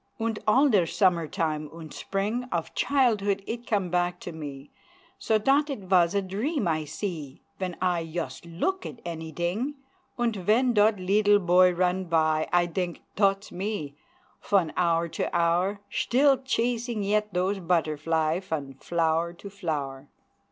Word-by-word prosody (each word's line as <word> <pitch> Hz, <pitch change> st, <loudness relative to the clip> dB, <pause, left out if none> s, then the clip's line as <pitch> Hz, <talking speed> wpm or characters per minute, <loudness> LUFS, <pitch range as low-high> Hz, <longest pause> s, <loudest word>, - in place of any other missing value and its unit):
Unt 225 Hz, -1 st, -1 dB
all 265 Hz, +7 st, +5 dB
der 200 Hz, -10 st, +3 dB
summertime 160 Hz, -5 st, 0 dB
unt 160 Hz, -2 st, -10 dB
spring 210 Hz, +6 st, -2 dB
Of 165 Hz, -1 st, -2 dB
childhood 210 Hz, -8 st, +1 dB
it 235 Hz, +1 st, -5 dB
come 195 Hz, -5 st, 0 dB
back 180 Hz, 0 st, 0 dB
to 175 Hz, -, -6 dB
me, 145 Hz, -3 st, -8 dB, 0.5 s
So 220 Hz, -, +2 dB
dot 275 Hz, +7 st, +2 dB
it 275 Hz, -, -2 dB
vas 185 Hz, -1 st, +3 dB
a 200 Hz, -, +2 dB
dream 210 Hz, -, -1 dB
I 155 Hz, -2 st, 0 dB
see 155 Hz, -5 st, -6 dB, 0.2 s
Ven 185 Hz, -2 st, -3 dB
I 180 Hz, -2 st, +2 dB
yust 165 Hz, +2 st, -5 dB
look 370 Hz, -, -2 dB
at 230 Hz, -, -9 dB
anyding, 175 Hz, -, -3 dB, 0.4 s
Unt 235 Hz, -3 st, 0 dB
ven 225 Hz, +7 st, +2 dB
dot 210 Hz, 0 st, +4 dB
leedle 205 Hz, +2 st, +4 dB
boy 180 Hz, -1 st, +5 dB
run 180 Hz, +1 st, 0 dB
by, 155 Hz, -2 st, +1 dB
I 175 Hz, 0 st, +4 dB
dink 175 Hz, 0 st, -3 dB
"dot's 195 Hz, 0 st, +1 dB
me," 180 Hz, -7 st, -4 dB, 0.4 s
fon 190 Hz, -6 st, +1 dB
hour 170 Hz, -1 st, +2 dB
to -, -, -3 dB
hour 175 Hz, +4 st, +1 dB
Schtill 270 Hz, +1 st, +3 dB
chasing 235 Hz, -3 st, -1 dB
yet 210 Hz, +1 st, +1 dB
dose 185 Hz, +2 st, 0 dB
butterfly 160 Hz, -1 st, 0 dB
Fon 160 Hz, -8 st, -4 dB
flower 165 Hz, 0 st, 0 dB
to 195 Hz, +3 st, -11 dB
flower! 145 Hz, -8 st, -4 dB
185 Hz, 150 wpm, -27 LUFS, 165-210 Hz, 0.5 s, all